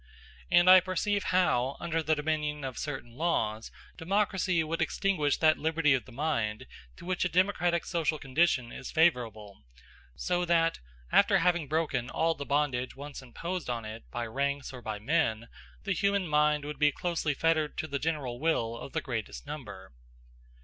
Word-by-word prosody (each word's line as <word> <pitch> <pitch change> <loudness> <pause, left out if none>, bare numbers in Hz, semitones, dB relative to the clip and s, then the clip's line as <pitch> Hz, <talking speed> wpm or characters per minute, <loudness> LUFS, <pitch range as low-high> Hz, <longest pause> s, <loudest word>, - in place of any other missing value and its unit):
And 175 +1 +5
I 185 0 +10
perceive 185 +3 -1
how, 140 -8 +2
under 165 -1 -1
the 155 0 +1
dominion 150 -1 -2
of 130 -3 -5
certain 135 -5 -5
laws, 115 -8 -1 0.3
democracy 185 -1 +1
would 165 +2 -3
extinguish 160 -2 +1
that 155 -1 +3
liberty 160 -2 +2
of 130 - 0
the 130 - -14
mind 120 -6 -2 0.3
to - - -12
which 185 0 -1
a 180 - +1
democratic 175 -2 +1
social 165 -3 0
condition 135 -3 +1
is - - -7
favorable; 115 - +1 0.5
so 180 0 -1
that, 165 -1 +2 0.3
after - - +5
having 175 -4 +1
broken 150 -5 -1
all 165 0 +1
the 140 -2 -7
bondage 140 -3 0
once 145 0 -8
imposed 170 +6 -5
on 115 -2 -3
it 110 +1 -8
by 120 -1 -3
ranks 140 +4 -2
or 125 - -8
by 110 -2 -4
men, 115 -2 0 0.3
the 195 - 0
human 200 -1 +1
mind 150 -1 +2
would 150 0 -6
be 150 -1 +4
closely 165 -2 -2
fettered 160 -1 +1
to 155 - -2
the 140 -2 -3
general 140 -6 -2
will 120 -8 0
of 125 - -9
the - - -1
greatest 110 - -5
number. 100 -10 -8
150 Hz, 170 wpm, -29 LUFS, 125-170 Hz, 0.5 s, I